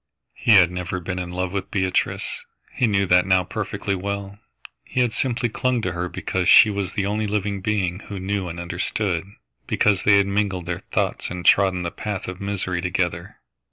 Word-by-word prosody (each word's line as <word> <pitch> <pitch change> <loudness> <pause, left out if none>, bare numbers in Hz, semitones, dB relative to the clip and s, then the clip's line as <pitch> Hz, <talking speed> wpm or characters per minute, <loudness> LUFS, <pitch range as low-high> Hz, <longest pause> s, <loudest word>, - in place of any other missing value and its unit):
He 115 - +4
had 90 -3 +6
never 90 0 -4
been 90 +1 -4
in 90 -1 -4
love 90 0 -3
with 100 0 -3
Beatrice. 95 -2 -1 0.3
He 125 - +2
knew 100 -2 +2
that 90 0 +4
now 95 -1 +4
perfectly 100 +2 -3
well. 100 +1 -4 0.4
He 125 - -1
had 120 -2 +1
simply 120 -1 0
clung 125 +2 0
to 90 - -1
her 90 +1 -3
because 90 0 -1
she 110 - +8
was 100 -2 -3
the 100 - -1
only 105 +1 -1
living 100 -1 -2
being 95 -3 -1
who 100 -2 -6
knew 95 0 -2
and 85 +1 -6
understood, 90 +1 -2 0.4
because 100 -3 +2
they 100 -1 +5
had 100 - +4
mingled 100 -3 -1
their 85 0 -3
thoughts - - -2
and 90 -1 -6
trodden 95 -2 +4
the 85 - -3
path 105 -4 -5
of 95 +1 -7
misery 95 -3 -2
together. 90 0 -2
95 Hz, 190 wpm, -23 LUFS, 90-100 Hz, 0.4 s, she